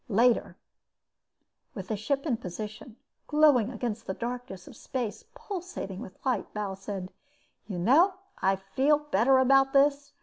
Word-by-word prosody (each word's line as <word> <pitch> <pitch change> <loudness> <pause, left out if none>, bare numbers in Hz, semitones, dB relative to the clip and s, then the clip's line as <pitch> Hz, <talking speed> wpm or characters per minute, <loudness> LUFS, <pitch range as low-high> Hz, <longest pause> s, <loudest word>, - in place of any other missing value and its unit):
Later, 235 +3 +2 1.2
with 190 -3 -7
the 220 - 0
ship 275 +8 -2
in 255 -7 0
position, 215 +4 -7 0.3
glowing 295 -7 +4
against 230 -2 -4
the 190 - -3
darkness 240 -6 -6
of - - -12
space, 245 -5 -5
pulsating 365 - -6
with 190 -5 -9
light, 260 -2 -1
Bal 205 -2 -3
said: 195 -1 -6 0.6
"You 195 -4 -4
know, 300 - +4 0.3
I 195 0 +3
feel 260 +10 +2
better 270 -3 +3
about 270 +1 +4
this. 285 +1 +3
240 Hz, 140 wpm, -28 LUFS, 200-275 Hz, 1.2 s, glowing